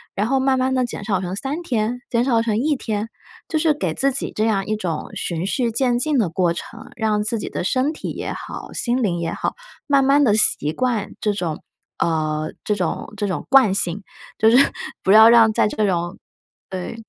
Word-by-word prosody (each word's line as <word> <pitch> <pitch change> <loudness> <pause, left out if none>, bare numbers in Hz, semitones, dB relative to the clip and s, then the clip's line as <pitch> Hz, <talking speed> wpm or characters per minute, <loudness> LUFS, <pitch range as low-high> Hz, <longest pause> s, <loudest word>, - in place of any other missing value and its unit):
然 205 - 0
后 270 +2 +1
慢 265 0 +2
慢 260 +1 +1
地 255 - +2
减 230 - -7
少 195 -3 0
成 185 0 -4
3 275 - -3
天， 240 -4 -1
减 235 0 +1
少 235 -4 +2
成 225 -2 -1
1 295 +6 +1
天， 220 -3 -3 0.4
就 315 - 0
是 310 -1 +3
给 295 - -2
自 275 +1 +1
己 270 - -2
这 215 - 0
样 200 -3 0
一 215 - -1
种 180 -6 -4
循 170 0 -3
序 240 +4 0
渐 240 +1 +1
进 300 +2 +1
的 205 -7 +1
过 170 0 +1
程， 170 - -9
让 215 -2 0
自 220 +2 0
己 - - -5
的 - - -4
身 260 - 0
体 - - -6
也 - - -5
好， - - -8
心 245 +1 0
灵 175 -5 0
也 170 - -2
好， - - -3 0.3
慢 280 -2 +4
慢 280 +2 +4
地 225 -6 +3
习 150 -8 +4
惯 240 -3 -1
这 210 - +1
种， 175 -6 -4 0.4
呃， 155 -1 -1
这 210 - 0
种 180 +1 -3
这 205 - -1
种 185 - -4
惯 265 -7 +5
性， 185 +1 0 0.4
就 220 - +5
是 240 - +6 0.5
不 190 - +2
要 220 +2 +9
让 230 -2 +6
在 - - +2
这 210 0 -1
种， 175 -2 -2 0.5
呃 185 +2 -5
220 Hz, 225 characters per minute, -21 LUFS, 190-255 Hz, 0.5 s, 要